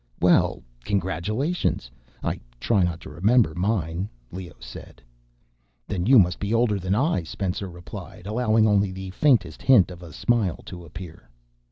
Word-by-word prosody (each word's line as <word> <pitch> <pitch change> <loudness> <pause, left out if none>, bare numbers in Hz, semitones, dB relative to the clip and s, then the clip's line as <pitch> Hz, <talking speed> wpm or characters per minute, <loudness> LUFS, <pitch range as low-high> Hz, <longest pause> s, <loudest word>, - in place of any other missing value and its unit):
Well, - - +3 0.2
congratulations. 100 - -1 0.3
I - - -2 0.2
try 105 - +2
not 85 -2 0
to - - -9
remember 100 +3 +3
mine," 90 -1 -1 0.2
Leoh 90 -4 -8
said. 60 0 -11 0.9
"Then 95 -2 -2
you 130 +1 +7
must 90 -4 +4
be 105 +3 0
older 115 -3 +2
than 95 +2 0
I," 145 - +1
Spencer 95 +3 -4
replied, 85 +1 -10
allowing 110 0 +2
only 100 -2 +3
the 95 0 -7
faintest 110 - +2
hint 105 -9 +5
of 90 -1 -10
a 85 -2 -10
smile 105 +1 0
to 90 -2 -9
appear. 85 +1 -10
95 Hz, 150 wpm, -25 LUFS, 85-110 Hz, 0.9 s, you